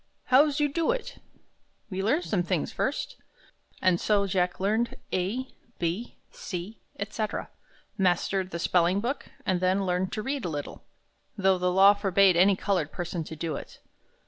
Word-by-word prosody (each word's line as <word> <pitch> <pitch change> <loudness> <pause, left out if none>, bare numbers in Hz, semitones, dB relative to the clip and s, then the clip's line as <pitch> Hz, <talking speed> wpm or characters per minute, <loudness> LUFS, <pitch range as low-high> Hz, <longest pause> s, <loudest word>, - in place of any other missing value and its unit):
"How's 290 +2 +5
you 295 - +3
do 320 +3 -1
it?" - - -2 0.7
"We 190 0 -2
learn 250 - +2
those 180 -4 0
things 70 - -1
first." - - -2 0.7
And 185 -2 +3
so 205 -2 +2
Jack 180 -2 0
learned 220 +5 0 0.2
A, 215 +9 -1 0.3
B, 175 +8 -3
C, 185 +2 -6 0.2
etc., 215 +1 -3 0.5
mastered 185 +1 +1
the 170 - -4
spelling 175 +2 +2
book, 250 +6 -3 0.2
and 185 -2 +1
then 185 +2 +1
learned 180 +1 0
to 215 - -3
read 270 +1 -2
a 175 - -2
little, 145 -2 -6 0.5
though 190 -2 +3
the 180 0 +1
law 195 +2 +7
forbade 195 -2 +4
any 190 +3 +5
colored 180 -6 -1
person 175 -1 -4
to 160 - -7
do 160 0 -3
it. - - -9
190 Hz, 160 wpm, -27 LUFS, 180-220 Hz, 0.7 s, law